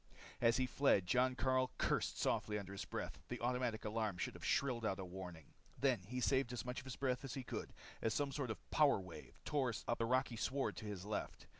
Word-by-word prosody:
As 115 -1 +5
he 130 - +3
fled, 125 -7 +4
Jon 125 +6 +3
Karyl 130 0 +2
cursed - - +1
softly 105 -1 +1
under 100 -2 -5
his 100 - -4
breath. - - -4
The - - -4
automatic 120 -2 0
alarm 105 -3 0
should - - -2
have - - -11
shrilled 125 -4 +2
out 95 -3 +1
a 95 - -4
warning. 90 -4 -8 0.3
Then 130 -5 +3
he 125 +3 -2
saved 130 -1 +2
as 120 -3 -3
much 125 0 -3
of - - -11
his 130 - -5
breath 130 -1 0
as 135 - -4
he 135 - -3
could - - -4 0.3
as 110 - +2
some 140 +4 +1
sort 135 -2 -2
of 110 - -6
power 145 -8 +5
wave 90 -3 -10
tore 140 -5 +2 0.2
up 120 - +1
the 115 - +2
rocky 130 -1 +2
sward 135 +4 0
to - - -6
his 100 -3 -4
left. 105 0 -3
120 Hz, 230 wpm, -39 LUFS, 105-130 Hz, 0.3 s, As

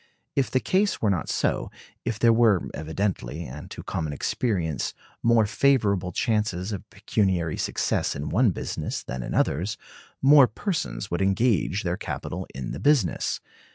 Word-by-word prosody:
If 135 -2 +2
the 130 - +2
case 200 +8 +1
were 105 - +2
not 90 -6 -1
so; - - 0 0.3
if 115 -2 -2
there 115 +1 +5
were, 110 -6 +4
evidently, 80 -2 -3
and 75 +3 -8
to - - -8
common 80 -3 -3
experience, 85 - -1 0.3
more 115 -2 +4
favorable 105 -7 +2
chances 105 -2 0
of 100 +1 -6
pecuniary 95 -6 0
success - - 0
in 70 - -4
one 115 +5 +4
business 90 - -3
than 65 - -5
in - - -4
others, 90 +9 +1 0.4
more 140 -1 +7
persons 110 - -3
would 85 - 0
engage 100 -1 +2
their 85 0 -1
capital - - -5
in 65 -2 -4
the - - -5
business. 140 - +2
100 Hz, 155 wpm, -26 LUFS, 85-115 Hz, 0.4 s, more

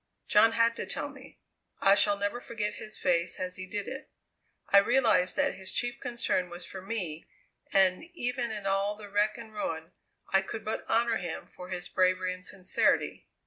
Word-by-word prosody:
John 225 +2 +6
had 230 0 +3
to - - -4
tell - - -1
me. - - -14 0.4
I 195 - +6
shall 205 0 +4
never 205 +4 -2
forget 210 -3 -3
his 215 0 -6
face 175 -1 +1
as 185 0 -3
he 185 0 -6
did 205 0 -4
it. 270 - -7 0.6
I 200 - +8
realized 225 -5 +3
that 280 -1 +2
his 190 0 -3
chief 245 +2 -1
concern 230 -6 0
was 175 +1 -7
for 190 - -7
me, 185 -6 -4 0.4
and 190 - +3
even 250 -4 -1
in 210 -2 -4
all 195 +1 +1
the 210 -1 -10
wreck 210 +2 +2
and 225 -2 -10
ruin 165 -5 -4 0.4
I 195 - +6
could 215 +3 -6
but 215 - -4
honour 230 0 +3
him 175 -2 -5
for 180 0 -10
his 180 -1 -4
bravery 185 0 +2
and 185 0 -11
sincerity. 185 -1 0
200 Hz, 185 wpm, -30 LUFS, 185-225 Hz, 0.6 s, I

